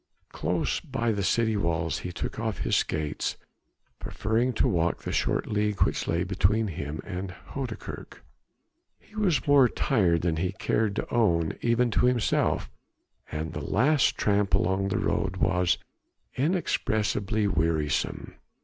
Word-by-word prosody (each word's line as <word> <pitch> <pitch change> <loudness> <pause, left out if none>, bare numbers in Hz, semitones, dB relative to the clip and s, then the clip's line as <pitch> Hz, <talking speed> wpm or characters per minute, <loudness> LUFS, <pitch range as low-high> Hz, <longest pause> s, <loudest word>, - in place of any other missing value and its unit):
Close - - -1
by 115 0 -2
the 100 -2 -1
city 110 +4 +2
walls 85 -4 -1
he 90 - -5
took 90 - -5
off 110 -2 -2
his - - +1
skates, 75 -2 -1 0.6
preferring 115 +5 0
to 115 - +1
walk 85 -1 0
the - - -3
short - - 0
league 105 -1 +1
which - - -1
lay 85 +1 +1
between 100 +4 +1
him 75 -2 -5
and 95 -1 -5 0.2
Houdekerk. 130 -5 -6 0.8
He 215 - -22
was 185 - +1
more 140 -4 +6
tired 90 - +1
than 85 -2 +1
he 90 +3 -1
cared 105 +1 0
to - - -4
own 85 -9 +2
even 120 0 +2
to 125 - +3
himself, 125 -3 +1 0.6
and 80 +1 -4
the - - -4
last 135 +7 +2
tramp 100 -1 +2
along 95 +2 +1
the 100 - 0
road 95 -3 -1
was 90 -1 +2 0.6
inexpressibly 110 - 0
wearisome. 80 -4 -1
100 Hz, 140 wpm, -27 LUFS, 85-115 Hz, 0.8 s, more